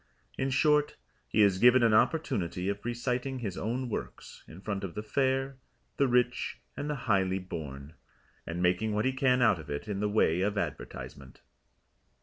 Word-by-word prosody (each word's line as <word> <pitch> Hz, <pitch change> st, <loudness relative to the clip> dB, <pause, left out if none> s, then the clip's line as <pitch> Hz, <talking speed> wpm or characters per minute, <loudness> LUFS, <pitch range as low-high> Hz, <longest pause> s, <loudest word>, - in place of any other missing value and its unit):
In 135 Hz, -, -1 dB
short, 150 Hz, +2 st, +3 dB, 0.3 s
he 110 Hz, -, +3 dB
is 95 Hz, -2 st, +3 dB
given 125 Hz, +2 st, +6 dB
an 115 Hz, -2 st, +4 dB
opportunity 105 Hz, -, +1 dB
of 100 Hz, 0 st, -4 dB
reciting 125 Hz, +2 st, -2 dB
his 105 Hz, -7 st, -4 dB
own 125 Hz, +4 st, -2 dB
works 115 Hz, -, -7 dB
in 80 Hz, -, -11 dB
front 100 Hz, 0 st, -4 dB
of 95 Hz, -4 st, -5 dB
the 105 Hz, -, -4 dB
Fair, 135 Hz, +3 st, 0 dB, 0.4 s
the 140 Hz, -, +3 dB
Rich 125 Hz, 0 st, +1 dB, 0.2 s
and 145 Hz, -, -4 dB
the 145 Hz, -4 st, -4 dB
Highly 95 Hz, -3 st, +2 dB
Born, 75 Hz, -5 st, -7 dB, 0.5 s
and 85 Hz, +2 st, -3 dB
making 90 Hz, +5 st, +1 dB
what 105 Hz, -, +1 dB
he 130 Hz, -, +1 dB
can 130 Hz, -2 st, +3 dB
out 105 Hz, -7 st, +4 dB
of 80 Hz, -, -11 dB
it 70 Hz, +8 st, -4 dB
in 100 Hz, -2 st, -3 dB
the 105 Hz, 0 st, 0 dB
way 90 Hz, -5 st, +2 dB
of 100 Hz, +2 st, 0 dB
advertisement. 70 Hz, -8 st, -6 dB
110 Hz, 175 wpm, -30 LUFS, 95-130 Hz, 0.5 s, given